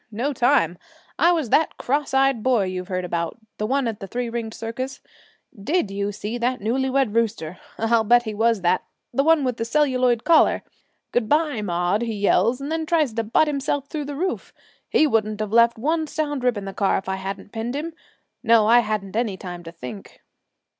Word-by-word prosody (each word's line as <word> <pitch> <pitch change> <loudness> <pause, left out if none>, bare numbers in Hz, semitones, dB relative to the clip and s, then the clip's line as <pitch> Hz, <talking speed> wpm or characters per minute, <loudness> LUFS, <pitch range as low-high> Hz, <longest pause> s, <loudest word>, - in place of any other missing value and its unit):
No 245 +7 -2
time. 240 - +2 0.4
I 340 +2 +5
was 315 -9 -1
that 320 - +2
cross 285 +3 -1
eyed 270 -3 +2
boy 245 -3 +2
you've 185 -1 -4
heard 185 -2 -2
about 170 -1 -3 0.2
the 215 - -1
one 270 0 +1
at 220 -2 -4
the 195 - -7
three 240 +2 -3
ringed 230 -2 -4
circus. 255 +4 -5 0.6
Did 220 - -1
you 200 +1 -2
see 210 +4 -5
that 250 +2 0
newly 255 +6 0
wed 265 -5 +1
rooster, 205 -7 -1 0.2
I'll 225 0 +2
bet 240 +2 +4
he 220 -2 -4
was 225 0 +1
that, 180 +1 +2 0.3
the 275 - +2
one 320 -1 +4
with 250 -3 -1
the - - -2
celluloid 255 -2 +2
collar? 330 -2 +4 0.5
"Good 235 -3 0
bye, 300 -6 +2
Maude!" 180 +2 0
he 230 -2 -2
yells, 205 +4 +2
and 280 +2 -5
then 320 -1 -2
tries 310 -8 +2
to 230 0 -1
butt 225 +8 +3
himself 280 -1 -2
through 300 -2 -4
the 290 0 -5
roof. 370 +6 -3 0.3
He 310 - +4
wouldn't 215 -6 0
have 215 0 -3
left 235 0 +5
one 315 +6 0
sound 290 -3 -2
rib 250 -3 +2
in 200 - -5
the 195 - -6
car 200 -1 +1
if 190 - -6
I 190 0 -1
hadn't 195 +1 -6
pinned 230 +3 -4
him. 320 +3 -4 0.5
No, 230 -2 +4
I 235 +2 +6
hadn't 210 -3 -2
any 220 -4 -1
time 175 -2 -7
to 165 - -8
think.' 125 - -10
230 Hz, 210 wpm, -23 LUFS, 205-275 Hz, 0.6 s, I